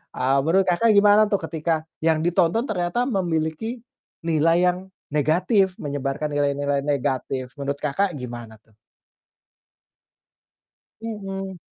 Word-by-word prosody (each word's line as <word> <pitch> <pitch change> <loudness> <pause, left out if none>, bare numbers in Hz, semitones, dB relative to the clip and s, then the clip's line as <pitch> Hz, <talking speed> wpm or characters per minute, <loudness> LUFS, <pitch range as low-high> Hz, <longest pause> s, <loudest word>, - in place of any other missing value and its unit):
eee, 135 +2 +2
menurut 190 +4 +4
Kakak 220 +6 +3
gimana 205 +1 +6
tuh 200 - +2
ketika 160 0 -1 0.2
yang 160 -1 +3
ditonton 175 +5 +2
ternyata 180 +4 0
memiliki 180 +4 -2 0.5
nilai 165 +2 +3
yang 180 - -7 0.3
negatif, 180 - +2
menyebarkan 145 +1 -3
nilai-nilai 145 -1 0
negatif, 130 -2 -2
menurut 140 +1 -3
Kakak 180 +6 0
gimana 120 -3 -8
tuh? 110 - -30 2.3
Mhm. 195 -4 -5
165 Hz, 110 wpm, -23 LUFS, 140-195 Hz, 2.3 s, gimana